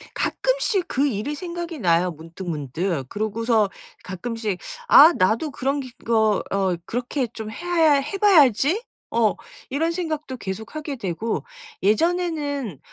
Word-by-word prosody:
가끔씩 - - 0
그 280 +2 +1
일이 250 +5 -2
생각이 340 -1 -5
나요 175 -1 +2
문득문득. 160 -2 -4
그러고서 215 0 +1 0.3
가끔씩 210 +1 -4 0.3
'아 315 +5 +9
나도 225 +11 +2
그런 275 +1 -1
기 255 -2 -7
거 220 -3 +2
어 195 -2 +1
그렇게 245 +3 -2
좀 220 -1 -7
해야 330 +3 +2
아 - - +5
해 285 +8 -1
봐야지.' 335 - +4 0.3
어 225 -3 +3 0.3
이런 320 +5 0
생각도 310 -6 -3
계속하게 225 +10 -5
되고 215 +1 -3 0.4
예전에는 290 - 0
245 Hz, 265 characters per minute, -23 LUFS, 200-310 Hz, 0.4 s, 아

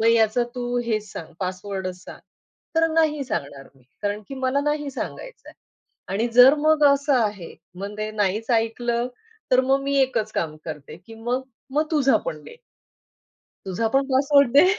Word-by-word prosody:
मग 225 - +2
याचा 230 +1 +4
तू 245 -1 -3
हेच 215 -3 -2
सांग, 165 0 -8
पासवर्डच 185 0 -4
सांग. - - -11 0.6
तर 325 - +5
नाही 305 -3 +2
सांगणार 140 - -5
मी. 130 - -24 0.2
कारण 205 +1 -1
की 275 - -6
मला 260 +1 0
नाही 295 0 -1
सांगायच - - -7
आहे. - - -12 0.6
आणि 220 +4 +1
जर 250 +3 +9
मग 310 0 +3
असं 280 0 +3
आहे, 210 -8 -1 0.2
मग 200 +2 -6
ते 215 0 -2
नाहीच 210 +2 -1
ऐकलं, 235 +1 0 0.4
तर 255 0 +6
मग 270 +1 +2
मी 280 0 -1
एकच 230 -5 0
काम 155 -2 -2
करते 150 -3 -8
की 225 - -11
मग, 240 +3 -2 0.3
मग 305 +2 +1
तुझा 280 -4 +4
पण - - -4
दे. 470 - -12 1.1
तुझा 205 +4 -1
पण 275 - +4
पासवर्ड 280 0 +4
दे 285 - +7
240 Hz, 170 wpm, -23 LUFS, 205-275 Hz, 1.1 s, जर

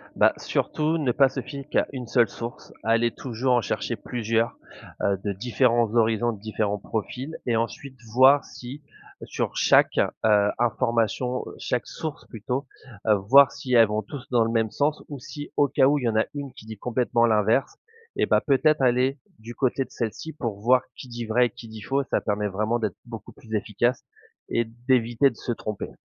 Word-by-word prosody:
Bah, - - +4
surtout 155 +2 -1
ne 135 -6 +1
pas 135 +2 +4
se 135 - -4
fier 140 -2 -8
qu'à - - +1
1 125 -3 -6
seule 120 -3 +3
source. 115 +4 -8
Aller 115 +1 +2
toujours 125 0 -2
en 120 - +3
chercher - - -2
plusieurs, 115 -1 -1 0.4
heu, 100 -1 +1
de 100 -1 -1
différents 120 +1 +1
horizons, 115 +1 +2
de 110 - -9
différents 105 -1 -2
profils 125 +9 -5
et 120 - +1
ensuite 130 +4 -3 0.2
voir 135 +3 +6
si 130 +4 -10 0.4
sur - - -3
chaque, - - +4 0.3
heu, 105 -1 +4
information, 120 +1 0
chaque 125 -4 -2
source 155 -2 -6
plutôt, 125 +5 -4 0.4
heu, 105 - +6
voir 130 +8 +6
si 130 -3 -5
elles 115 -2 +7
vont 105 +1 -1
tous 130 +5 -9
dans 120 -2 +4
le 115 - -1
même 115 -2 +1
sens 150 +1 0
ou 145 - -7
si 145 +3 -8
au 145 - +4
cas 135 -1 +3
où 145 0 +3
il - - -6
y 115 - +3
en 110 - -2
a 110 - +3
une 140 -3 -6
qui 130 -5 -14
dit 110 -1 -8
complètement 120 +1 +1
l'inverse, 110 +3 +2 0.4
et - - +2
bah, - - +3
peut-être 150 +1 +2
aller 130 +2 +2 0.2
du 115 +2 -9
côté 135 0 0
de - - -24
celle-ci 120 +7 -4
pour 115 -8 -4
voir 125 +2 +4
qui - - -10
dit 120 -1 -6
vrai 120 +3 +3
et - - -10
qui 120 0 -12
dit 110 -1 -10
faux, 135 +6 0
ça - - +1
permet 105 0 -1
vraiment 105 +4 -1
d'être 110 -5 -2
beaucoup 115 -4 -9
plus 110 -2 -13
efficace 115 +4 0 0.5
et 115 - +1
d'éviter 120 +2 +1
de 120 - -13
se 120 - -4
tromper. 105 -3 -5
120 Hz, 200 wpm, -25 LUFS, 110-130 Hz, 0.5 s, elles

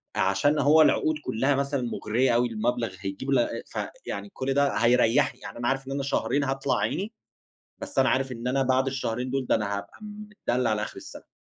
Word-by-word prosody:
عشان 100 +11 +2
هو 150 +3 +6
العقود 155 0 +3
كُلّها 135 +5 +1
مثلًا 140 -1 -1
مُغرية 120 +1 0
أوي، 120 +1 +3
المبلغ 115 -2 -2
هيجيب 100 +8 -4
ل - - +3 0.3
ف - - -6 0.3
يعني 205 - -5
كل 135 +1 -2
ده 140 0 +2
هيريّحني، 125 +3 +3
يعني - - -9
أنا 120 0 -2
عارف 135 0 -1
إن - - -5
أنا 140 0 -2
شهرين 140 0 0
هاطلع 135 0 0
عيني، 210 +5 -2 0.7
بس - - -3
أنا 130 - +4
عارف 135 0 0
إن 120 0 -5
أنا 135 +1 +1
بعد 130 +1 +2
الشهرين 125 -1 -2
دول، 135 -1 -1
ده - - +3
أنا 100 -2 -1
هابقى 100 - -10
متدلّع 210 - -3
على 105 -1 0
آخِر - - -5
السَنة. - - -11
130 Hz, 200 wpm, -26 LUFS, 115-140 Hz, 0.7 s, هو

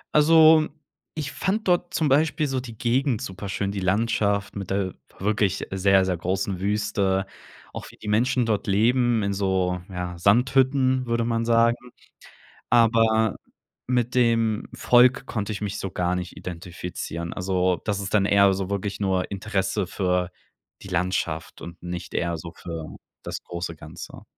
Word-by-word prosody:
Also, 155 0 +6 0.5
ich 150 -2 -4
fand 205 +2 -2
dort 175 +1 +1
zum 155 -3 +1
Beispiel 150 +2 +2
so 135 -1 -1
die 120 -3 -9
Gegend 125 +1 +1
superschön, 100 +1 -4
die 100 - -4
Landschaft 100 +1 0
mit 100 -3 -5
der 95 -1 -1 0.3
wirklich 100 -1 0
sehr, 95 0 +3
sehr 90 -2 -1
großen 95 +1 -2
Wüste. 100 -1 0 0.5
Auch - - -8
wie - - -17
die 105 - -8
Menschen 125 +3 +2
dort 105 -3 -1
leben, 115 +2 +2
in 100 - 0
so, 95 -2 0
ja, 90 -2 -5
Sandhütten, 130 +5 +3
würde 115 0 0
man 115 0 -1
sagen. 115 0 +3 0.9
Aber 115 -2 +4 0.5
mit 125 -1 0
dem 115 -3 +2
Volk 125 +2 +4
konnte 105 -1 -3
ich 105 - -5
mich 100 -2 -3
so 95 - -4
gar 90 -1 0
nicht 90 -1 -5
identifizieren. 85 -1 -6
Also, 90 -1 0
das 100 -2 -1
ist 100 -1 -5
dann 100 -2 +3
eher 100 -1 +5
so 95 0 -4
wirklich 100 +1 -3
nur 95 -2 0
Interesse 100 0 -1
für 90 0 -1 0.5
die - - -10
Landschaft 90 -3 -2
und 85 0 -10
nicht 90 0 -6
eher 85 0 0
so 85 +1 -8
für 80 -2 -7 0.3
das - - -6
große 85 -1 -5
Ganze. 80 +2 -10
100 Hz, 155 wpm, -24 LUFS, 95-120 Hz, 0.9 s, Also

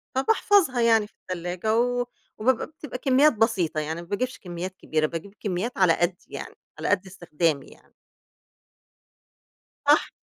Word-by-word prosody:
فباحفظها 325 - +3
يعني 225 -2 +4
في - - -31
التلاجة 180 +5 -2
و 245 0 +1 0.3
وبابقى 250 +2 +2
بتبقى 300 -3 -8
كميات 275 +3 +4
بسيطة 205 -8 +1
يعني، 160 +2 -3
ما 170 - -12
باجيبش 250 +7 -2
كميات 180 +1 -6
كبيرة 155 -1 0
باجيب 170 +5 -5
كميات 205 +5 -2
على 185 -3 +5
قدِّي 175 +2 -1
يعني، - - -7 0.2
على - - -2
قد 200 -1 +2
استخدامي 165 -5 -1
يعني. - - -19 1.9
صح. - - +5
200 Hz, 140 wpm, -25 LUFS, 175-245 Hz, 1.9 s, على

